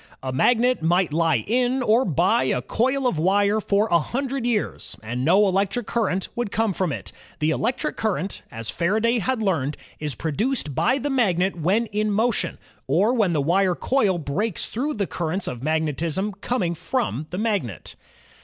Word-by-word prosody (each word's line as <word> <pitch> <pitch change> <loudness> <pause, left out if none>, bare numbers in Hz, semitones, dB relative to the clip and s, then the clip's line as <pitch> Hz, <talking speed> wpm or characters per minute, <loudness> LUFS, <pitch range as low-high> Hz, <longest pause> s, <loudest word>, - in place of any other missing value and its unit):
A 130 -1 -3
magnet 245 - +3
might 175 0 +2
lie 160 -7 +2
in 250 +3 +1
or 235 +3 +3
by 170 -4 +2
a 125 -1 0
coil 260 +4 0
of 210 -11 +1
wire 200 +5 +3
for 205 +2 +2
a 170 - +5
hundred 260 - -2
years, 225 -4 -2
and 120 +3 -3
no 180 +8 +5
elec 195 0 +2
tric 245 -3 -3
current 195 -5 -1
would 240 -4 -2
come 220 -2 +1
from 180 -3 -1
it. - - -6 0.3
The 155 +1 +1
electric 255 - -1
current, 200 -3 -2
as 115 -2 -4
Faraday 220 +7 +1
had 225 +3 -1
learned, 150 -8 0 0.2
is 150 -4 -1
produced 165 - -2
by 255 - +2
the 285 +1 -2
magnet 190 -8 +2
when 185 +8 +1
in 215 0 -1
motion, 225 +4 0 0.3
or 220 +5 +3
when 210 -8 +2
the 145 -3 +1
wire 180 +3 +2
coil 210 -7 +1
breaks 170 +7 -2
through 280 +7 -2
the 205 -2 0
currents 175 +2 -3
of 120 -2 -5
magnetism 160 +6 0
coming 210 -9 0
from 190 - -2
the 180 - -5
magnet. 200 - -2
195 Hz, 175 wpm, -23 LUFS, 160-235 Hz, 0.3 s, a